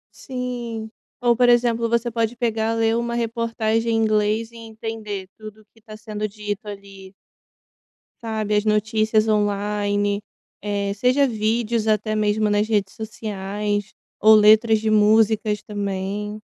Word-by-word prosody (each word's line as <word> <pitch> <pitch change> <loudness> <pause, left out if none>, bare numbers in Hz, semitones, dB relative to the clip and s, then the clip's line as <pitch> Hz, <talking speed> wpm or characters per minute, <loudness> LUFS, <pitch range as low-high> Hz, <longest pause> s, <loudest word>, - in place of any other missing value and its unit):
Sim, 240 -4 -5 0.3
ou 240 -1 +3
por 245 0 +4
exemplo, 235 -1 +2
você 235 0 0
pode 230 +1 -1
pegar, 225 -1 0
ler 225 0 +2
uma 235 0 -2
reportagem 230 -1 -1
em - - +2
inglês, 215 +1 +1
e 235 - -13
entender 220 -3 -6
tudo, 215 0 -11
que 225 - -23
está 215 0 -12
sendo 215 -1 -4
dito 205 0 -6
ali. 195 -1 -10 1.1
Sabe, 215 -1 -1
as 210 - +2
notícias 215 +1 +1
online, 205 -1 0 0.4
eh, 200 -1 -2
seja 255 +6 +2
vídeos, 220 0 -1
até 215 0 0
mesmo 210 0 +1
nas 205 +1 +2
redes 200 -3 0
sociais, 205 -1 -4 0.2
ou 220 0 +6
letras 215 +1 +6
de 220 0 -1
músicas 215 0 +3
também. 205 +1 -4
215 Hz, 135 wpm, -22 LUFS, 210-225 Hz, 1.1 s, ou